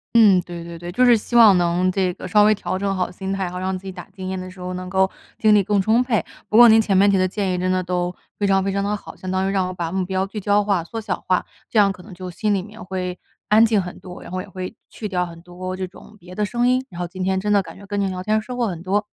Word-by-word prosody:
嗯， 205 -6 +6
对 175 -1 -8
对 170 0 -8
对， 175 +1 -7
就 250 +7 +3
是 240 -1 +7
希 230 +2 -3
望 220 -5 +8
能 175 +1 +2
这 185 -1 0
个 180 - -8
稍 210 +3 +5
微 215 +1 +5
调 185 -2 -3
整 195 0 -1
好 185 -1 -1
心 190 +1 -5
态， 195 -1 -1
然 175 - -4
后 - - -3
让 185 0 -2
自 185 - -18
己 190 - -5
打 180 -1 -9
经 190 -1 -7
验 190 0 -3
的 185 0 -7
时 185 0 -14
候 180 0 -4
能 180 0 -6
够 190 +1 +2 0.3
精 215 -1 +5
力 205 - +5
更 205 +1 +2
充 220 +5 +3
沛。 240 -4 +1 0.3
不 215 - +2
过 240 0 +10
您 220 0 +7
前 205 -2 0
面 200 +2 +5
提 195 - +3
的 185 0 +3
建 190 0 -1
议 - - 0
真 185 +1 0
的 185 0 +1
都 180 0 -2 0.2
非 205 - +1
常 195 -1 +3
非 195 - -1
常 200 0 -1
地 205 +1 0
好， 205 - -8
相 185 - -6
当 190 +1 0
于 - - 0
让 190 -2 +1
我 - - -4
把 170 -2 -4
目 190 +1 -1
标 190 +1 -1
聚 210 +2 -7
焦 205 +1 +2
化、 200 -5 0
缩 225 +6 -6
小 210 -4 -4
化， 185 -1 +1 0.2
这 225 - +1
样 200 -1 +6
可 185 -2 -8
能 200 - -13
就 180 0 -7
心 210 +4 -1
里 190 - 0
面 215 +3 -11
会 180 -1 -4 0.3
安 215 +2 +6
静 220 -2 +3
很 180 -1 -7
多， 180 -1 -10
然 - - -10
后 185 +1 -3
也 - - -13
会 185 +2 -6 0.2
去 215 - -6
掉 180 -2 0
很 170 -1 -10
多 180 +1 -7
这 190 - -2
种 200 +3 -16
别 180 -1 -12
的 210 - 0
声 240 +3 +1
音， 255 +1 +2
然 175 - -8
后 175 - -2
今 185 +1 -5
天 190 0 +1
真 210 +2 -2
的 200 -1 +4
感 - - -12
觉 200 - -13
跟 205 0 -3
您 195 -1 0
聊 185 -1 -4
天 215 +2 +1
收 250 +4 -7
获 240 - +1
很 175 -5 -5
多。 200 +3 0
190 Hz, 345 characters per minute, -21 LUFS, 180-205 Hz, 0.3 s, 过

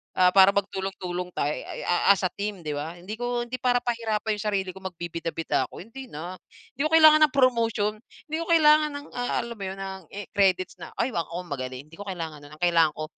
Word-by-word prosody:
Ah, 180 -1 +5
para 195 0 +8
magtulong-tulong 190 -2 -3
tayo 145 - 0
ay - - -6
a 175 +2 +4
as - - -5
a - - +2
team 205 -2 -4
di 150 - -2
ba? 155 +4 -5
Hindi 200 +5 -6
ko 245 0 -1
hindi 255 +2 -5
para 245 -1 +3
pahirapan 220 -3 -1
yung 215 - -5
sarili 195 -2 0
ko - - -9
magbibida-bida 170 -6 -2
ako - - -10
hindi 260 +4 -10
na, 175 +5 -6 0.4
hindi 275 - -4
ko - - +2
kailangan 310 -1 +8
ng - - -27
promotion, 230 -5 +2 0.4
di 315 - 0
ko - - -5
kailangan 305 -2 +5
ng, 285 0 -7
ah, 245 0 -2
alam 235 0 -7
mo - - -5
yun 190 - -5
ng, 190 0 -6
i 205 - -4
credits 185 -2 +2
na - - -6
ay 245 +2 0
wa 170 - 0
ako 175 +2 -5
magaling 130 -1 -5
hindi 165 - -16
ko 205 - -6
kailangan 165 -5 -5
non, 150 - -14
ang 175 - -7
kailangan 165 -3 +4
ko, 155 - -3
195 Hz, 230 wpm, -26 LUFS, 175-235 Hz, 0.4 s, para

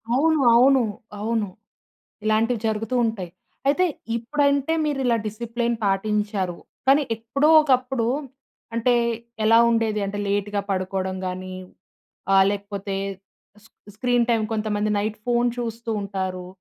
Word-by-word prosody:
అవును. 315 +3 +3 0.2
అవును. 260 +1 +5 0.4
అవును. 220 0 -1 0.8
ఇలాంటివి 220 +1 +1
జరుగుతూ 220 +2 -2
ఉంటయి. 195 -6 -3 0.4
అయితే 330 +7 +3 0.3
ఇప్పుడంటే 280 +4 +1
మీరిలా 265 -5 +1
డిసిప్లేన్ 235 +2 -2
పాటించారు. 200 -2 0 0.3
కానీ 275 +3 +5
ఎప్పుడో 275 +7 0
ఒకప్పుడు 255 -4 +1 0.7
అంటే, 235 +2 +2 0.5
ఎలా 225 +1 +6
ఉండేది 225 -2 +1
అంటే 200 +1 -4
లేట్‌గా 205 0 0
పడుకోవడం 190 0 -2
గాని 185 0 -5 0.8
ఆహ్, 195 0 +6
లేకపోతే 200 -1 -4 0.7
స్ - - -17 0.3
స్క్రీన్‌టైమ్ 240 -1 +1
కొంతమంది 215 -1 -1
నైట్ 215 +1 -2
ఫోను 240 0 +2
చూస్తూ 230 -1 -4
ఉంటారు, 190 -2 -4
220 Hz, 110 wpm, -23 LUFS, 200-245 Hz, 0.8 s, ఎలా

